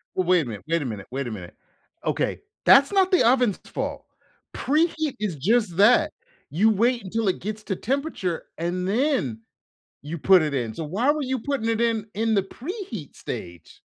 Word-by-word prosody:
Wa 185 - +1
wait 180 -1 +4
a - - -6
minute 105 - -7
wait 165 -1 +1
a - - -3
minute 105 -5 -6
wait 135 -1 -3
a - - -4
minute, 90 -5 -8 0.5
okay, - - -1 0.3
that's 275 +4 +7
not 385 -1 +3
the 365 - +5
oven's 245 -5 +3
fault. - - -4 0.5
Preheat 310 0 0
is 205 -7 -2
just 190 - +1
that, 245 +9 +5 0.4
you 195 +10 +3
wait 235 +2 +2
until 215 +2 -2
it - - -1
gets 215 +1 -5
to 195 - -2
temperature, 260 - -2
and 180 +2 -2
then 205 - 0 0.6
you 155 +4 -5
put 185 +3 +6
it 150 -2 -1
in. 120 -5 -2
So, 165 - -5
why 215 - +1
were 300 -1 -2
you 260 -1 -1
putting 260 -3 -2
it 225 0 0
in 225 -2 0
in 225 +2 0
the 195 - +2
preheat 255 - -7
stage? 85 -2 -8
210 Hz, 190 wpm, -24 LUFS, 165-255 Hz, 0.6 s, that's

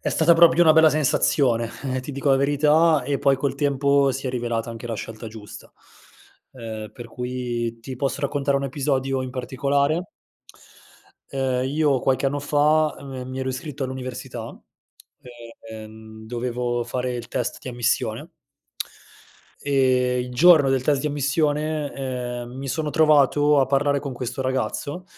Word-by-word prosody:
è - - -2
stata 165 +1 +4
proprio 165 0 +6
una 160 -2 +7
bella 160 0 +6
sensazione, 135 -5 +2 0.3
eh, 130 - -1
ti 135 +3 -7
dico 140 +1 0
la 135 - +5
verità. 150 +2 +3
E 140 +2 -1
poi 140 -1 +3
col 135 0 -1
tempo 140 0 +2
si 135 +1 -5
è - - -1
rivelata 120 -2 -2
anche 115 0 -8
la 115 - -3
scelta 115 +1 -7
giusta, 110 -2 -11 0.8
ehm, 110 -4 -7
per 120 0 -9
cui 120 -1 -4
ti 130 +1 -7
posso 135 -1 -2
raccontare 140 0 0
un 140 - -2
episodio 135 -1 -1
in 130 - -5
particolare. 140 +6 -1 1.2
Ehm, 130 -2 -1
io 145 -1 +2
qualche 135 +2 +1
anno 145 +1 -1
fa, 150 +2 +2
ehm, 140 - -11
me 130 -1 -6
mi 130 0 -6
ero 130 - -2
iscritto 135 +2 -5
all'università, 130 -1 -6 1.1
ehm, 110 0 -11
dovevo 120 0 -2
fare 125 +1 -3
il 120 -1 -6
test 125 0 -3
di - - -8
ammissione. 120 -2 -1 1.3
Ehm, 130 -3 +2
il 125 - -5
giorno 150 0 +6
del 130 -1 +1
test 140 0 +1
di 150 - -2
ammissione, 150 +1 0
ehm, 125 -2 -4
mi 135 0 -6
sono 155 +2 -2
trovato 150 -2 +4
a 135 - +2
parlare 140 +1 +2
con 140 -1 -5
questo 125 +1 -5
ragazzo 130 +6 -3
135 Hz, 155 wpm, -23 LUFS, 125-145 Hz, 1.3 s, una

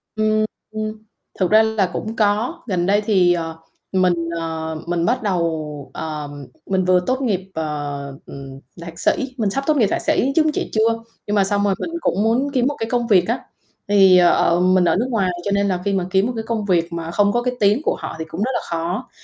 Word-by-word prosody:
Ừm, 215 0 +2 0.9
thực 185 -1 +1
ra 220 +1 +7
là 220 -4 +1
cũng 220 +1 -4
có, 220 +10 0
gần 180 -4 0
đây 205 +2 +3
thì, 190 -5 +3
ờ, 165 -2 -4 0.3
mình, 185 -2 +3 0.3
ờ, 160 -1 -4
mình 170 -1 0
bắt 245 +4 0
đầu, 160 -7 -2
ờ, 150 -2 -5 0.4
mình 185 -1 0
vừa 185 0 +4
tốt 260 +1 0
nghiệp, 205 -8 0
ờ, 145 -3 -4 0.2
ừm, 135 -1 -10 0.2
thạc 170 0 -9
sĩ 260 -1 0
mình 215 -4 +1
sắp 275 +7 -1
tốt 305 -1 +3
nghiệp 225 -6 +4
thạc - - -1
sĩ, 270 - +1
chứng 310 -1 +4
chỉ - - -3
chưa. 225 +1 +2 0.3
Nhưng 210 - 0
mà 200 - +4
xong 200 +1 0
rồi 200 -1 +2
mình - - -3
cũng 200 - +1
muốn 245 +6 +1
kiếm 255 -2 +2
một 290 - -1
cái 225 - -3
công 240 -1 0
việc 185 -5 +4
á, 235 +3 0 0.5
thì, 195 -2 +6
ờ, 175 -1 +4
mình 185 0 +4
ở - - +3
nước 235 +6 0
ngoài 200 -7 +1
cho 200 - -1
nên 200 0 +2
là 180 -2 -1
khi 200 - +1
mà 190 -2 0
kiếm 190 +1 +3
một 250 - -3
cái 225 - -3
công 225 -3 -2
việc 175 -3 +1
mà 165 0 -4
không 205 +3 +3
có 240 - +1
cái 250 0 -1
tiếng 210 +4 +3
của - - +1
họ - - -6
thì 160 - -3
cũng 165 +4 -6
rất 250 +5 0
là - - 0
khó, 175 +8 -3
195 Hz, 230 wpm, -20 LUFS, 170-225 Hz, 0.9 s, ra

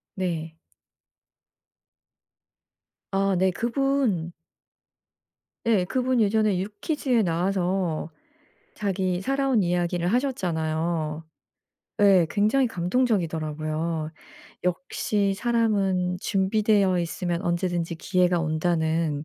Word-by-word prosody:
네. 165 -4 -3 2.6
아 195 0 +1
네. 190 +1 +3
그분 235 - 0 1.3
예 215 -6 +3
그분 255 +5 0
예전에 215 -2 +2
유퀴즈에 230 - -1
나와서 180 -2 -1 0.6
자기 190 -3 -1
살아온 270 -1 +1
이야기를 175 0 0
하셨잖아요. 165 - -1 0.8
예. 195 -4 +6
굉장히 215 +8 +2
감동적이더라고요. 165 -7 -1 0.5
역시 200 0 0
사람은 195 -6 +1
준비되어 195 -1 +2
있으면 170 +1 -2
언제든지 175 -1 -1
기회가 180 +1 +1
온다는 160 -2 0
185 Hz, 205 characters per minute, -25 LUFS, 170-210 Hz, 2.6 s, 예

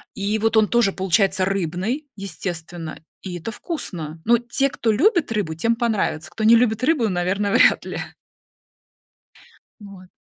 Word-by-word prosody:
И 205 +2 -1
вот 225 +1 +1
он 215 -1 +5
тоже 235 -5 +2
получается 190 0 +1
рыбный, 195 - -2
естественно, 175 -4 -6 0.2
и 180 -2 -6
это 200 +7 -6
вкусно. 170 - -5
Но 235 0 +4
те, 255 +3 0
кто 225 - 0
любит 340 - +2
рыбу, 205 -8 -1
тем 230 +9 0
понравится, 210 -9 -1
кто 220 - -5
не 225 +2 +7
любит 230 0 +2
рыбу, 260 -5 +2
наверно, 190 +3 -1
вряд - - +4
ли. - - -5 1.8
Вот. 195 -3 -12
205 Hz, 145 wpm, -22 LUFS, 180-230 Hz, 1.8 s, не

